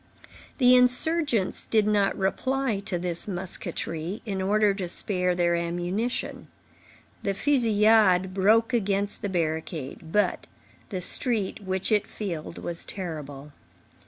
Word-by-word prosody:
The 250 -2 +6
insurgents 250 - +2
did 215 -2 +2
not 205 -2 +1
reply 240 +4 -1
to 185 -4 -1
this 175 +1 -4
musketry, 180 0 -4
in 195 -3 -3
order 205 +1 +2
to 190 -3 -5
spare 180 -1 0
their 170 -1 +1
ammunition. 175 +7 -3 0.7
The 200 -1 -2
fusillade 215 -6 +3
broke 220 +5 +3
against 200 -3 -1
the 205 - -3
barricade; 160 -3 -4
but 210 +3 0 0.4
the 185 -4 -4
street, 215 +2 +3
which 190 0 -1
it 210 -2 +2
filled, 170 -6 -6
was 170 -1 -4
terrible. 150 -6 -6
195 Hz, 120 wpm, -26 LUFS, 175-215 Hz, 0.7 s, The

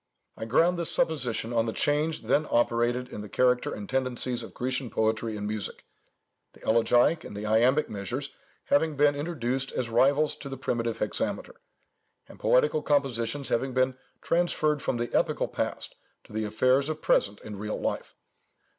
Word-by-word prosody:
I - - -6
ground 170 +9 +3
this 170 - +8
supposition 125 -7 0
on 115 0 +1
the 110 - -2
change 150 +1 0
then 145 +7 +1
operated 120 +1 +1
in 105 - -7
the 105 - -9
character 125 +3 +2
and 105 -1 -6
tendencies 130 -2 -1
of - - -9
Grecian 125 0 -2
poetry 110 0 -1
and 105 - -4
music—the 105 -1 -9
elegiac 120 +7 +3
and 100 - -8
the 105 - -5
iambic 120 +7 +3
measures 120 +8 -4 0.3
having 155 +1 +2
been 145 0 +4
introduced 135 -4 -2
as 120 -2 -3
rivals 140 +6 +3
to 140 - -8
the 135 - -6
primitive 115 -2 -2
hexameter, - - -3 0.7
and - - -15
poetical - - +3
compositions 140 -2 0
having 130 +2 -1
been 130 0 +2 0.3
transferred 155 -4 +1
from 120 - -1
the 120 0 -3
epical - - +1
past - - -3 0.3
to - - -16
the 110 0 -1
affairs 130 +7 +2
of 155 0 -4
present 100 +1 +2
and 105 -2 -8
real 105 +1 -4
life. - - -3
125 Hz, 165 wpm, -27 LUFS, 115-145 Hz, 0.7 s, this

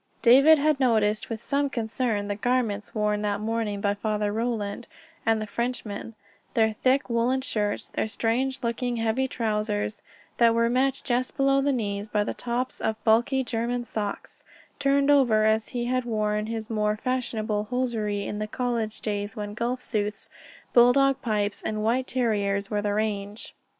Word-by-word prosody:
David 275 +6 +7
had 300 -1 +2
noticed 215 -5 +2
with 225 0 -5
some 280 +2 0
concern 225 -3 -1
the 205 - -1
garments 220 -3 -1
worn 210 -1 +1
that 205 -1 -1
morning 215 -1 -2
by 200 0 +2
Father 210 0 -1
Roland 225 -1 -2 0.4
and 225 -1 +3
the 215 - -3
Frenchman 230 -1 -4 0.4
their 220 -1 +3
thick 260 +5 +1
woollen 240 +2 +1
shirts, 210 -5 -2
their - - -2
strange 250 +5 -1
looking, 240 +1 -1
heavy 225 +4 0
trousers 210 -3 -2 0.4
that 230 -1 +5
were 230 0 +2
met 265 +2 +1
just 250 +2 -1
below 275 0 +3
the 285 +1 +2
knees 205 -4 -2
by 210 -1 +1
the - - -3
tops 250 +1 -3
of 220 - 0
bulky 240 +4 +3
German 240 0 -2
socks, 210 -3 -5 0.4
turned 280 0 +3
over 240 -7 +4
as 220 0 +2
he 240 -1 -3
had 255 +1 0
worn 210 -2 -1
his 225 -1 -4
more 210 -1 0
fashionable 220 -4 -2
hosiery 220 -4 -1
in 210 - -4
the 215 - -2
college 235 -2 -2
days 205 0 -3
when 205 -2 -5
golf 240 +3 -2
suits, 210 -2 -3 0.4
bulldog 265 +3 +5
pipes, 210 -3 -1
and 215 0 -3
white 250 +4 +1
terriers 205 -5 0
were 210 -1 0
the 205 0 -1
rage. 210 -1 -3
225 Hz, 165 wpm, -26 LUFS, 210-250 Hz, 0.4 s, David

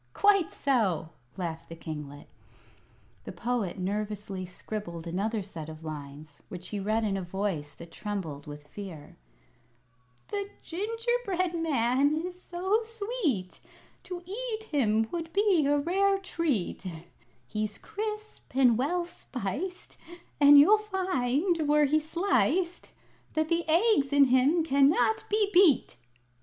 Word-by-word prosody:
"Quite 400 -4 +4
so," 205 - +1 0.3
laughed 165 -3 -5
the 165 - -7
kinglet. 150 -3 -8 1.0
The - - -6
Poet 235 -6 -2
nervously 200 -1 -3
scribbled 175 -2 -6
another 200 +5 -1
set 165 -5 -8
of 155 0 -10
lines, 150 -1 -8
which 180 -1 -5
he 205 - -3
read 215 +3 0
in 200 -2 0
a - - -3
voice 175 -6 -3
that 170 0 -12
trembled 165 -10 -5
with 145 0 -9
fear: 170 -4 -9 1.1
"The 405 -1 -3
Gingerbread 420 -1 -1
Man 285 -3 +2
is 360 0 -7
so 380 +6 0
sweet, 415 - -2 0.5
To 360 -1 -6
eat 440 +3 -4
him 225 - +1
would 330 -1 -4
be 395 -8 +3
a 290 0 +3
rare 390 +6 +2
treat; 330 - -2 0.6
He's 215 +5 -3
crisp 425 - -6
and 250 -4 +5
well 345 +6 0
spiced, 340 - -6 0.4
And 290 0 +9
you'd 415 +9 +7
find, 340 -5 0
were 300 0 +5
he 305 +2 +3
sliced, 340 - 0 0.4
That 315 0 0
the 335 -1 0
eggs 330 -4 +3
in 285 0 +6
him 270 +6 +4
cannot 275 -6 +3
be 415 -1 +2
beat!" 345 - +5
275 Hz, 125 wpm, -29 LUFS, -, 1.1 s, And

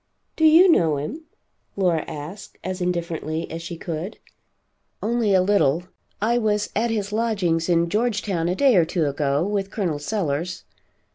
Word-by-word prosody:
"Do 320 - +2
you 325 +4 +8
know 165 - +3
him?" 295 - -5 0.5
Laura 175 -5 +1
asked, 155 +7 -8
as 185 0 -4
indifferently 170 -2 -2
as 165 +1 -5
she 170 0 -6
could. 170 +5 -5 0.9
"Only 225 -1 +1
a 185 - +4
little. 180 -5 +2 0.4
I 235 +3 +2
was 210 -2 0
at 230 +3 +1
his 210 -2 -2
lodgings' 195 -7 0
in 170 -1 +3
Georgetown 200 -4 0
a 180 - 0
day 270 +1 +4
or 175 - +6
two 165 0 -1
ago, 145 +2 0
with 200 -1 -1
Col. 180 -9 -2
Sellers. 170 0 -2
180 Hz, 155 wpm, -23 LUFS, 165-215 Hz, 0.9 s, you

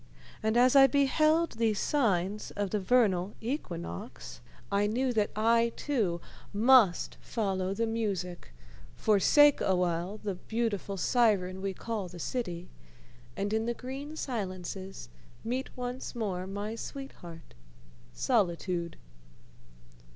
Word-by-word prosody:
And 220 +2 +1
as 255 +2 +5
I 270 -1 +9
beheld 310 +5 +3
these 220 -3 +2
signs 210 -7 0
of 205 -2 -2
the 210 - +1
vernal 200 -3 +2
equinox 165 - -6 0.3
I 200 +1 +2
knew 250 +4 0
that 215 -2 +1
I, 230 +2 +3
too, 215 -12 -1 0.3
must 220 -3 +4
follow 195 -3 -2
the 230 +2 0
music, 195 - -3 0.4
forsake 285 +8 +5
awhile 180 +1 0
the 205 -2 -3
beautiful 205 0 -3
siren 190 -4 +2
we 195 -1 -3
call 220 -3 -4
the 175 0 -11
city, 175 -3 -4 0.7
and 205 +2 -1
in 220 +1 0
the 235 - -1
green 275 +5 -7
silences 190 - -5 0.4
meet 250 +3 -2
once 250 +1 -5
more 190 -5 -2
my 205 +3 -4
sweetheart 225 - -9 0.6
Solitude. 170 - 0
210 Hz, 115 wpm, -30 LUFS, 185-240 Hz, 0.7 s, I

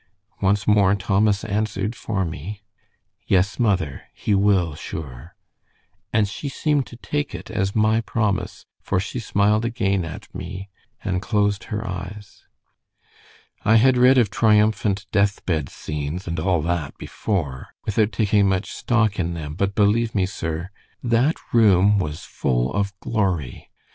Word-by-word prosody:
Once 100 +1 +2
more 100 -2 +4
Thomas 100 +1 +1
answered 105 0 -2
for 100 -4 -2
me. 90 +6 -6 0.7
"'Yes, 95 +4 +2
mother, 95 - 0
he 105 - -1
will, 95 -5 +3
sure,' 75 +1 -8 0.8
and 105 -1 +3
she 140 +7 -5
seemed 145 -1 0
to - - -11
take 145 +4 -3
it - - -8
as 100 -3 -1
my 110 +1 +3
promise, 105 -4 -2 0.2
for 95 - 0
she 95 +6 -4
smiled 105 0 +2
again 100 -5 0
at 80 -2 -8
me, 95 +2 -7 0.3
and 90 -1 -1
closed 100 -1 0
her 105 0 -4
eyes. 95 +2 -8 1.2
"I 110 +2 +4
had 130 +3 +5
read 125 +2 +6
of 115 -5 +3
triumphant 105 -2 +2
death 100 -1 +1
bed 80 -6 -1
scenes, 75 +5 -5
and 85 0 -2
all 90 -5 +1
that 85 -4 -2
before, 75 -11 -3 0.2
without 105 +1 +1
taking 100 0 +2
much 95 +1 -1
stock 110 -4 +1
in 85 -1 -1
them, 75 -3 -5
but 100 +3 -1
believe 110 +2 +2
me, 95 -2 +3
sir, 85 0 -4 0.3
that 125 +6 +2 0.2
room 105 -3 +5
was 75 -4 -3
full 60 0 -1
of 100 0 0
glory. 95 - -2
100 Hz, 145 wpm, -23 LUFS, 90-110 Hz, 1.2 s, read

